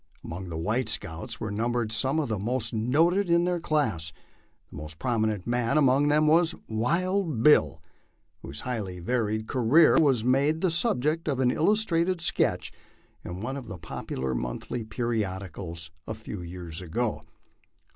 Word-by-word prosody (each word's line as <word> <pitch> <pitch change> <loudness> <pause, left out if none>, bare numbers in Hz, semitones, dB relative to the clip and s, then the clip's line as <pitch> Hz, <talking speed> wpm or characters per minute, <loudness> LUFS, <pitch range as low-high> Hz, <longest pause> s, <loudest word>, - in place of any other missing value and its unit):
Among 90 +2 -6
the 80 - -5
white 110 +8 -1
scouts 80 -6 -3
were 110 - -4
numbered 115 +1 -1
some 130 +7 +2
of 150 - -1
tho 110 -3 -1
most 115 +2 -2
noted 165 - +2
of 170 +1 +4
their 180 -1 0
class. 110 - -1 0.6
The - - -9
most 75 +1 -8
prominent 110 -3 -1
man 120 +3 +1
among 140 0 +4
them 150 +1 +3
was 165 +2 +4
" - - -35
Wild 165 - 0
Bill," 150 - +5 0.6
whose 70 +2 -7
highly 105 -8 -4
varied 110 +2 -1
career 135 +8 +5
was 135 -8 +3
made 140 +6 +2
the 185 - +2
subject 165 - 0
of 140 -4 0
an 125 -1 +3
illustrated 180 - +2
sketch 170 - +1 0.5
in 90 +2 -6
one 130 +4 -3
of 135 -4 -7
the 100 -4 -7
popular 65 -5 -4
monthly 60 - -4
periodicals 95 -7 -4 0.2
a 110 - -4
few 105 -3 -7
years 85 -1 -7
ago. 110 +6 -2
120 Hz, 155 wpm, -27 LUFS, 95-150 Hz, 0.6 s, Bill